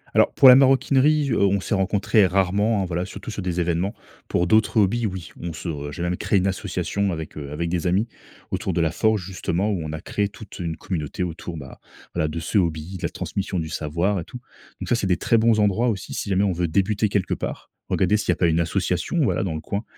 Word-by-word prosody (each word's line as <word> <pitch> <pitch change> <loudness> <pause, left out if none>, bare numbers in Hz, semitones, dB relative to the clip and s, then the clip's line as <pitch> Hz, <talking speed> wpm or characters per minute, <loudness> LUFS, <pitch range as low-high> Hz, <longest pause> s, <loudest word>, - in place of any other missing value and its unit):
Alors - - +5
pour 135 - +6
la 125 - +11
maroquinerie, 140 +2 +4
heu, - - +1
on 100 0 +3
s'est 105 - -3
rencontré 100 +1 +3
rarement 100 +3 +1
hein - - -1
voilà 90 0 -2
surtout 100 +3 -7
sur 100 - -5
des 90 -1 -2
événements 90 +5 0 0.3
pour 85 - +1
d'autres 110 +3 +3
hobbies 110 +3 +1
oui 95 -3 -7
on 85 -1 -4
se 75 -3 -5
j'ai 85 +5 -5
même 90 0 -1
créé 100 - +1
une 95 - +1
association 95 0 -1
avec, 80 -2 -6
heu, 70 -2 -6
avec 85 +3 -2
des 90 0 -1
amis 100 +6 +2 0.4
autour 95 - -2
de 85 - +1
la 80 -1 +1
forge 110 0 +1
justement 95 +1 -1
où 90 -5 -1
on 75 - -5
a 80 0 -5
créé 100 +1 -1
toute 105 -2 -12
une 85 -2 -3
communauté 85 0 -3
autour 85 -1 -5
bah 65 -2 -10 0.3
voila 80 -3 0
de 80 +2 -4
ce 85 +5 +1
hobby, 85 +1 -2
de - - -12
la - - 0
transmission 95 -1 -4
du 80 -2 -2
savoir 85 +6 -1
et - - -4
tout, 125 - -9 0.4
donc - - -6
ça, - - +3
c'est 100 - -1
des 90 - +2
très 115 - +2
bons 115 -1 +3
endroits 105 +4 +2
aussi 95 -5 -4
si 100 - -4
jamais 95 +1 +2
on 100 - +2
veut 85 0 -1
débuter 100 +5 +1
quelque 100 -2 0
part. - - -5 0.2
Regarder 95 +3 +2
s'il 100 - -4
y - - +7
a - - +1
pas 85 - +2
une 80 +1 +2
association, 90 - -1
voilà, - - +1
dans 85 -5 -2
le 80 - -4
coin 100 +7 -3
95 Hz, 245 wpm, -23 LUFS, 85-105 Hz, 0.4 s, la